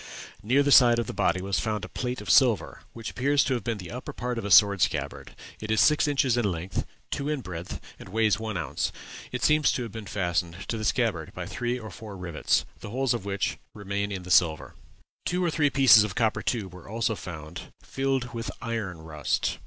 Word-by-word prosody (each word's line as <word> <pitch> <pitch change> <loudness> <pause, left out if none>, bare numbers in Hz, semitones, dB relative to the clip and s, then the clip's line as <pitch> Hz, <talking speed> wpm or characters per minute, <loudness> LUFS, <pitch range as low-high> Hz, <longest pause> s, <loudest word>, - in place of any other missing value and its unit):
Near 130 +7 +3
the 145 - +1
side 120 -3 +7
of 120 - 0
the - - -6
body 90 +2 +1
was 95 -4 0
found 105 +4 -2
a - - -8
plate 125 -2 -4
of 105 - -8
silver, 120 -6 +3
which 115 -1 -7
appears 140 +2 +2
to 135 - 0
have 120 -5 -2
been 115 0 -2
the 90 -4 -8
upper 125 +1 -6
part 125 0 -3
of 115 - -6
a - - -2
sword 100 -1 +6
scabbard; - - -2 0.2
it 110 - -7
is 110 - +2
six 150 0 +4
inches 135 -4 +2
in 105 -5 +1
length, 85 +2 -4 0.2
two 140 +1 -2
in 150 -3 -1
breadth, 90 -4 -6 0.2
and - - -11
weighs 110 0 +2
one 110 -3 -3
ounce. 85 - -2 0.4
It - - -4
seems 150 -1 +4
to 125 - -2
have 115 - -7
been 110 -1 -8
fastened 90 -2 -2
to 115 - -1
the 110 - -3
scabbard 105 -10 0
by - - -5
three 120 0 -2
or 110 -3 -8
four 105 -3 -9
rivets, 85 -4 0
the - - -8
holes 130 +3 0
of 115 -5 -4
which 100 -1 -2 0.2
remain 100 0 -3
in 95 -2 -4
the 90 - -7
silver. 80 -4 +3 0.5
"Two 180 0 0
or 170 - +1
three 150 -2 +2
pieces 130 -6 +7
of 105 -4 -4
copper 115 -3 +1
tube 100 -7 -2
were 90 +1 -12
also 115 +1 0
found, 85 -2 -8
filled 135 -2 -2
with 115 -1 -4
iron 105 -9 -4
rust. 75 -4 -2
110 Hz, 225 wpm, -27 LUFS, 95-125 Hz, 0.5 s, side